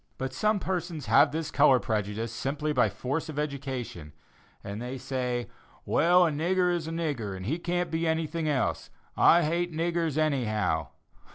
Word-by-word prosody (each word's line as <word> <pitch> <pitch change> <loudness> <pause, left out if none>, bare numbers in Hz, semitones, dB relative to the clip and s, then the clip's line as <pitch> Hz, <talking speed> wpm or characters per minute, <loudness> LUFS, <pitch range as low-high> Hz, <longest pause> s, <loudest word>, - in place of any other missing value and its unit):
But 130 0 -4
some 215 0 +1
persons 175 -6 -3
have 145 +1 +5
this 155 0 -3
color 140 -3 +5
prejudice 110 0 -2
simply 140 +6 -2
by - - +4
the - - -8
force 145 +6 -3
of 150 - -7
education, 130 - -4 0.5
and 100 +2 -6
they 125 +2 -5
say, 125 -2 -2 0.4
"Well, 175 +2 +4
a 165 - +1
nigger 180 +4 +1
is 170 -2 -2
a - - -4
nigger, 140 - -3
and 95 - -7
he 155 - -1
can't 175 +1 -1
be 165 +1 0
anything 160 0 -1
else. 135 -4 -1 0.3
I 170 +1 +6
hate 170 +3 0
niggers, 165 -1 -1
anyhow." 110 - 0
150 Hz, 170 wpm, -28 LUFS, 125-165 Hz, 0.5 s, I